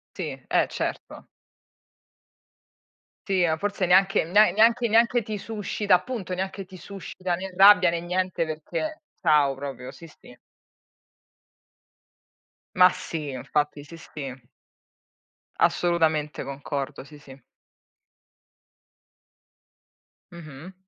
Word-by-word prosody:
Sì, - - -5
eh - - +2
certo. - - -5 2.0
Sì, 185 -3 +2
ah 160 -1 +1
forse 200 +1 -2
neanche 190 0 +4
ne 205 +6 +5
neanche 230 +2 +3
neanche 235 +2 +3
ti 215 0 -5
suscita 210 -1 -2
appunto, 190 -1 -4
neanche 190 +1 -4
ti 185 - -14
suscita 185 0 -5
né 190 +1 -7
rabbia 190 -2 +7
né 170 0 -2
niente 180 0 -1
perché 160 - -5 0.2
ciao 150 -5 +3
proprio, 135 -2 -7
sì, 165 - -13
sì. 125 -5 -17 2.4
Ma 180 0 +7
sì, 155 -5 -6
infatti 145 +3 -2
sì 165 +3 -12
sì. 130 -6 -9 1.1
Assolutamente 160 -4 +1
concordo, 140 0 -5
sì, 150 +2 -15
sì. 135 -2 -14 3.0
Mh-mh. 165 +1 -11
175 Hz, 100 wpm, -25 LUFS, 150-195 Hz, 3.0 s, rabbia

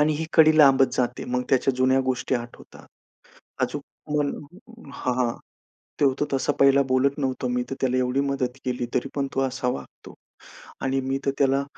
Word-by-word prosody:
आणि 155 +1 +3
ही 160 - -3
कडी 155 -1 +6
लांबत 135 -2 +6
जाते, 125 - -1
मग 125 0 -1
त्याच्या 135 0 +2
जुन्या 130 +1 +3
गोष्टी 130 0 -1
आठवतात. 120 -1 -8 0.8
आजूक - - -1 0.3
मन 145 -1 +1 0.6
हां, 125 - -2
हां, 120 -2 0 0.7
ते - - +4
होतो 140 +2 +1
तसा 135 +2 +1
पहिला 140 0 +6
बोलत 140 +3 +2
नव्हतो 130 -2 -2
मी 125 0 0
तर - - -2
त्याला 130 -1 +1
एवढी 130 +2 +1
मदत 135 -2 -2
केली 125 -1 -2
तरी 125 - 0
पण 140 -1 -1
तो 135 - +1
असा 130 -1 -2
वागतो. 70 - -7 0.7
आणि 135 0 0
मी 135 +1 -2
तर 140 - +2
त्याला, 140 0 +2
135 Hz, 180 wpm, -24 LUFS, 125-140 Hz, 0.8 s, कडी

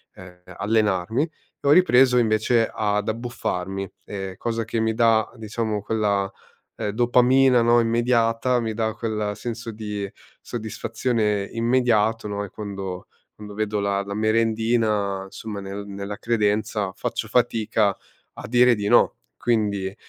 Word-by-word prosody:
ehm, 90 -1 -13
allenarmi 105 +3 0
e 155 -3 -9
ho - - +6
ripreso 130 -7 +5
invece 115 0 +2
ad 105 -1 0
abbuffarmi, 95 -5 -3 0.2
ehm, 95 -2 -6
cosa 115 +1 -2
che 115 +1 -2
mi 110 0 +1
dà, 115 -1 +3
diciamo, 110 -1 -3
quella, 100 -3 0 0.5
ehm, - - -2
dopamina 125 +2 +4
no, 120 +1 +4
immediata, 115 +1 +2
mi 115 -2 -2
dà 110 0 -1
quel 105 -2 -2
senso 115 +1 -6
di 105 -2 -5 0.3
soddisfazione 110 -1 -2
immediato 115 -2 +1
no, 100 0 -3
e 100 - -7
quando 95 -3 -6 0.3
quando 105 -1 -10
vedo 105 0 -1
la 100 0 0
la 100 0 -6
merendina 110 -2 +1
insomma, 105 +1 -7
nel 100 +1 -6
nella 100 +1 -6
credenza 105 -3 0
faccio - - -3
fatica 110 -4 +1 0.4
a - - -9
dire 125 +2 +5
di 105 -1 -3
no. - - +4 0.2
Quindi, 100 - 0
110 Hz, 135 wpm, -23 LUFS, 100-115 Hz, 0.5 s, ho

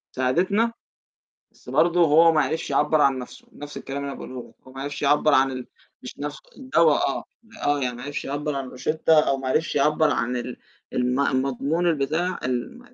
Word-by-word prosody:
ساعدتنا، 185 - +1 0.8
بس - - -22
برضه 175 +1 +3
هو 165 +1 +6
ما 155 - +3
عرفش 160 - -2
يعبّر 155 - +2
عن 135 -2 +3
نفسه، 125 - -10
نفس 145 0 -10
الكلام 140 +1 -5
اللي 140 -1 -5
باقوله 130 -1 -8
لك، - - -22
هو 130 - -13
ما 135 - -7
عرفش 145 +1 -5
يعبّر 145 +1 +3
عن 135 0 +4
ال 130 -1 -6 0.4
مش 125 - -9
نفس 145 0 -5 0.2
الدوا 170 - +3 0.2
آه، 135 - -3 0.4
آه 145 0 +2
يعني 125 -2 -2
ما 120 - -9
عرفش 145 +2 -5
يعبر 145 +2 -3
عن 135 -1 -4
روشتة 155 +4 +2
أو 135 - +2
ما 135 -1 -4
عرفش 155 +4 0
يعبر 150 +2 +3
عن 125 -2 -1
ال 125 0 -5 0.4
الم 125 +2 0
المضمون 140 +5 0
البتاع 165 +3 0
ال 125 - -3
145 Hz, 190 wpm, -24 LUFS, 130-160 Hz, 0.8 s, هو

